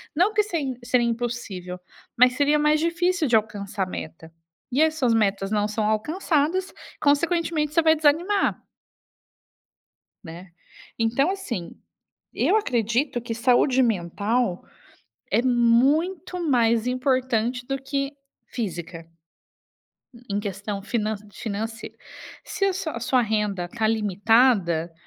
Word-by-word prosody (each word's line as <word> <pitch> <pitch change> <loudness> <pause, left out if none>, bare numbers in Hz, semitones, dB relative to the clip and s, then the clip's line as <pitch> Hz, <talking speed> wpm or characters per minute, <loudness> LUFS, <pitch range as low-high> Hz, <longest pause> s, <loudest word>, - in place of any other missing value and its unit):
não 360 +6 +4
porque 425 -1 +2
sem 290 - -3
seria 245 -1 +2
impossível, 225 -7 -4 0.4
mas 250 +1 +6
seria 290 +2 +2
mais 300 +1 +3
difícil 340 0 0
de 235 - +3
alcançar 205 -2 -1
a 185 - -5
meta 160 -1 -8 0.4
e 275 +5 +2
essas 310 -7 +2
metas 200 -3 +1
não 210 -1 +1
são 215 0 -2
alcançadas, 310 - 0 0.3
consequentemente 310 0 +1
você 330 - +4
vai 320 0 +5
desanimar. 330 +7 +1 1.6
Né? 175 +3 -10 0.5
Então, 230 +7 +1
assim. 240 - -5 0.7
Eu 430 - +3
acredito 240 - 0
que 235 0 -6
saúde 250 +2 +3
mental 205 0 -1 0.7
é, 235 - +2
muito 275 +10 +2
mais 235 -2 +2
importante 250 -2 0
do 270 - -1
que 275 +1 -3 0.3
física, 175 -7 -5 1.3
em 200 - 0
questão 200 0 -4
finan 215 +1 -2 0.2
financeira. 225 +2 -5 0.5
Se 395 - -2
a 390 - +1
sua 330 -8 -4
a - - -4
sua 250 +2 +2
renda 210 -5 -1
tá 225 +3 -4
limitada, 205 -5 +2
240 Hz, 120 wpm, -24 LUFS, 210-295 Hz, 1.6 s, mas